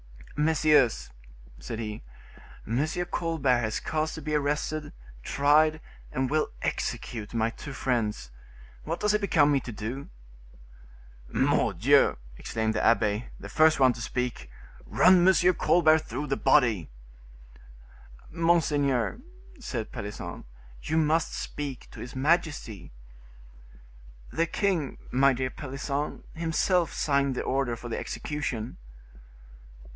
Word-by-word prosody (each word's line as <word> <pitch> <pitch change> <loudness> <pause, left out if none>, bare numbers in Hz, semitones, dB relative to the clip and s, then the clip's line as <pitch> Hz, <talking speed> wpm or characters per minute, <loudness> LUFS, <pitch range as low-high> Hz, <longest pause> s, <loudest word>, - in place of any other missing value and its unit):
"Messieurs," 150 - +3 0.5
said - - -6
he, 105 -2 -5 0.6
"M. 120 +6 0 0.3
Colbert 150 -7 +1
has 110 -2 -1
caused 155 0 -2
to 160 - -7
be 155 - -3
arrested, 150 +1 -1 0.3
tried 150 - +3 0.3
and 130 0 -1
will 155 0 +1
execute 110 -1 -3
my 115 0 +1
two 135 +4 -9
friends; 110 - -2 0.5
what - - -3
does 210 0 +2
it 210 - +1
become 155 -7 +3
me 140 - +3
to 120 - -8
do?" 115 +6 -6 1.2
"Mordieu!" - - +3 0.2
exclaimed 110 -1 -2
the 110 - -1
abbe, 110 -1 +2
the - - -9
first 155 -1 +4
one 130 -2 +5
to 115 - -9
speak, 120 - -3 0.4
"run 180 -1 +5
M. 185 -1 +5
Colbert 160 -2 +4
through 145 -2 -5
the 135 -1 -1
body." 115 - +3 1.4
"Monseigneur," 155 - +1 0.4
said 120 - -5
Pelisson, 100 -4 -7 0.4
"you 160 - -1
must 160 +1 +1
speak 140 -4 -5
to - - -11
his 125 - -8
majesty." 145 - -1 1.4
"The 165 - 0
king, 175 -7 -1
my 135 +2 +4
dear 130 +1 -2
Pelisson, 140 +1 -4
himself 165 +1 +1
signed 140 -2 +1
the - - -2
order 135 -3 0
for 120 +1 -9
the 115 - -3
execution." 130 -6 -4
140 Hz, 120 wpm, -27 LUFS, 120-155 Hz, 1.4 s, one